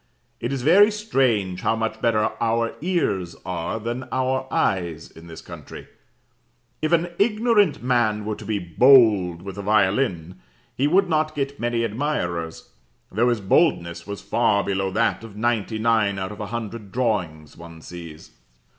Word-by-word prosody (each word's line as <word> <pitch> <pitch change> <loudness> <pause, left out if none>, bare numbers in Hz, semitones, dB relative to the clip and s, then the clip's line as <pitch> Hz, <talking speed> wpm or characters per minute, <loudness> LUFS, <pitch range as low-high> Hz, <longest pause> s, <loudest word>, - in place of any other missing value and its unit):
It 120 - -3
is 135 -3 -3
very 195 +8 +6
strange 125 - 0
how 115 - +1
much 110 0 -3
better 110 -2 +2
our 115 0 0
ears 100 - -1
are 90 +4 -3
than 120 +3 -4
our 130 0 -1
eyes 85 -6 -1
in 80 +1 -14
this 80 -1 -10
country: - - -10 0.9
if 155 +1 0
an 170 +1 +2
ignorant 210 - +2
man 120 -4 +1
were 105 0 -2
to - - -10
be 110 -1 -1
"bold" 95 - +4
with 100 +1 -7
a - - -2
violin, 95 - 0 0.3
he 140 - +1
would 190 +5 +3
not 155 -2 0
get 140 0 -3
many 120 0 0
admirers, 100 - -3 0.4
though 120 +5 +2
his 120 -3 0
boldness 85 - +1
was 100 -1 -6
far 100 -1 +2
below 95 -1 -1
that 115 +4 0
of 110 -2 -11
ninety 110 -1 -1
nine 110 -3 +1
out 95 +1 -4
of 105 - -10
a 105 - -4
hundred 115 -2 -6
drawings 90 - -2
one 85 -1 -12
sees.' 85 -1 -11
110 Hz, 160 wpm, -23 LUFS, 95-130 Hz, 0.9 s, very